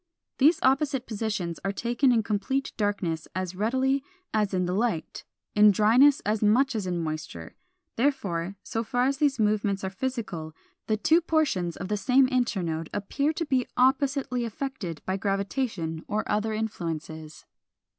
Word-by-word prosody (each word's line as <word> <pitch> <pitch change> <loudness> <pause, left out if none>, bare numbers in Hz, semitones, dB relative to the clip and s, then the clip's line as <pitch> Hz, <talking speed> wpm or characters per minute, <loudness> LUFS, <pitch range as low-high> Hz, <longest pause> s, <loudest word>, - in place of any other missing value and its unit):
These 300 +6 +5
opposite 270 -1 +2
positions 205 -6 -3
are 195 - 0
taken 240 +5 +1
in 230 -2 +3
complete 260 +7 -1
darkness 195 -7 -1
as 185 -1 -3
readily 260 +7 +1 0.3
as 210 -2 +1
in 180 -2 0
the 180 - -1
light, 210 -5 -2 0.3
in 210 0 +7
dryness 230 +8 +5
as 210 +1 -1
much 250 +6 +3
as 205 -4 -2
in 175 -1 -1
moisture: 155 - -6 0.4
therefore, 200 -9 0
so 225 - -2
far 245 +2 0
as 275 +1 +1
these 285 -2 +2
movements 210 -2 +1
are 190 - -2
physical, 195 -9 -4 0.3
the 215 - +1
two 320 +10 +4
portions 285 - 0
of 180 - -5
the 210 +1 -1
same 260 +5 +4
internode 185 - -1
appear 275 +9 -1
to 330 +1 -2
be 260 -4 +1
oppositely 260 -1 +2
affected 230 - -5
by 190 +1 -1
gravitation 195 -4 -2
or 210 +1 -1
other 210 +1 0
influences. 165 -7 -5
215 Hz, 155 wpm, -27 LUFS, 185-260 Hz, 0.4 s, in